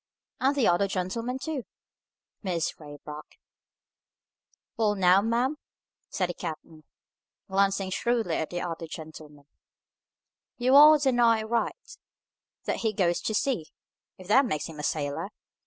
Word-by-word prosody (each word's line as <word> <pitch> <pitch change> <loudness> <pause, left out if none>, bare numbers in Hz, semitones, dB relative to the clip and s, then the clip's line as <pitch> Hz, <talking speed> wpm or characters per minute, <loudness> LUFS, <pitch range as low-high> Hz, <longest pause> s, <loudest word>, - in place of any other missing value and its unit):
"And 270 +2 +2
the 270 -5 +2
other 175 +3 +3
gentleman, 205 +7 -3
too," 290 0 -4 0.8
said 195 - -5
Mrs. 160 - -3
Raybrock. 150 0 -10 1.4
"Well 210 -2 +1
now, 185 0 +5
ma'am," 240 +7 0 0.5
said 185 -2 -1
the - - -2
captain, 160 -2 -8 0.6
glancing 195 0 +1
shrewdly 225 -4 0
at 160 - -2
the 175 - -4
other 165 -1 -5
gentleman, 155 -2 -10 1.1
"you 255 +1 +2
are 300 +2 +9
that 275 -2 +2
nigh 230 -2 +3
right, 235 - -3 0.7
that - - -2
he 220 -2 -1
goes 175 -3 +1
to 220 - -2
sea, 210 - 0 0.5
if 185 - -13
that 260 +6 +5
makes 150 -8 -2
him 160 -2 -9
a - - -5
sailor. 145 -2 -2
195 Hz, 140 wpm, -27 LUFS, 165-240 Hz, 1.4 s, are